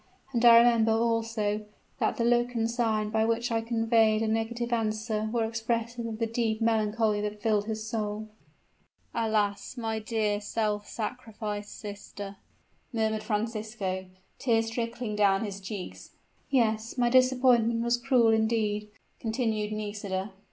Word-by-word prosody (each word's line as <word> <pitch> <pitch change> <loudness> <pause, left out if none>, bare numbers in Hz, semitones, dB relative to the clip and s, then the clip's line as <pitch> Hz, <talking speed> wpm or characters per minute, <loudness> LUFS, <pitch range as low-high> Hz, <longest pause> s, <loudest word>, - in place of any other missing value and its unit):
And 235 -1 +1
I 230 -1 +10
remember, 230 -1 +5
also, 225 -2 0 0.4
that - - 0
the 235 - +1
look 240 +1 +2
and 225 - +1
the - - +2
sign, 220 -3 0
by 220 0 +2
which 230 +2 0
I 225 0 +1
conveyed 225 -1 +2
a - - 0
negative 235 +2 -1
answer 215 -1 -1
were 230 -1 +1
expressive 230 +1 -2
of 220 -1 -5
the 230 - 0
deep 225 -1 -1
melancholy 220 -1 +1
that 210 0 -4
filled 210 -2 +1
his 220 0 -4
soul." 215 -1 -3 0.9
"Alas! 215 0 0
my 225 -2 -2
dear 215 -2 -1
self 210 -1 -1
sacrificed 215 -3 -5
sister," 205 -1 -8 0.5
murmured 220 -2 0
Francisco, 215 -3 -3 0.3
tears 225 -3 +1
trickling 230 -1 -3
down 200 0 +3
his 200 -1 -6
cheeks. 195 -1 -7 0.3
"Yes 225 -2 +1
my 240 -1 +2
disappointment 250 -3 +4
was 235 +1 +2
cruel 240 -2 +3
indeed," 220 -2 +1 0.3
continued 220 -2 -1
Nisida. 205 -2 -3
225 Hz, 140 wpm, -28 LUFS, 210-230 Hz, 0.9 s, I